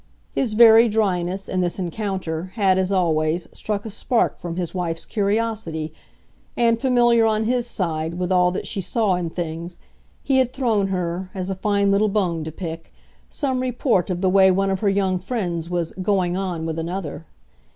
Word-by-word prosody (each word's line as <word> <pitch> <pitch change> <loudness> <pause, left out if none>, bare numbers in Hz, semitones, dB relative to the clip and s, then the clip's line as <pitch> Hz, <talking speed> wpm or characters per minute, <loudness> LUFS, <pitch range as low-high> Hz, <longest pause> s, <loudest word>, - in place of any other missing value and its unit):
His 230 -5 -1
very 230 0 +8
dryness, 195 -3 0
in 185 - -1
this 175 -1 -1
encounter, 185 -2 -3
had, 190 -4 +3
as 190 +1 0
always, 165 -2 +1
struck 210 -1 -3
a 220 - -5
spark 235 +3 0
from 170 -1 -5
his 175 -2 -3
wife's 170 -3 -3
curiosity, 205 -7 -1 0.6
and, 230 -1 +2
familiar, 240 -3 +4
on 215 0 +1
his 245 +1 0
side, 165 -6 -2
with 180 +1 -2
all 180 -1 +4
that 180 - -4
she 200 - -3
saw 215 0 +1
in 175 -2 -2
things, 170 +1 -5 0.5
he 265 -1 +2
had 255 -1 +1
thrown 225 -7 +1
her, 180 -1 -3
as 185 0 -3
a - - -2
fine 200 +1 +1
little 205 +2 +3
bone 180 -6 0
to 160 - -5
pick, 165 0 -7 0.4
some 265 -4 -1
report 245 - 0
of 180 -1 -2
the 190 - +3
way 190 0 +6
one 195 +1 +2
of 190 - -1
her 205 - +2
young 190 -2 +1
friends 175 -6 -3
was 175 -2 -2
"going 185 -3 +1
on" 180 -4 -3
with 165 0 -3
another. 170 -1 -5
190 Hz, 185 wpm, -22 LUFS, 175-215 Hz, 0.6 s, very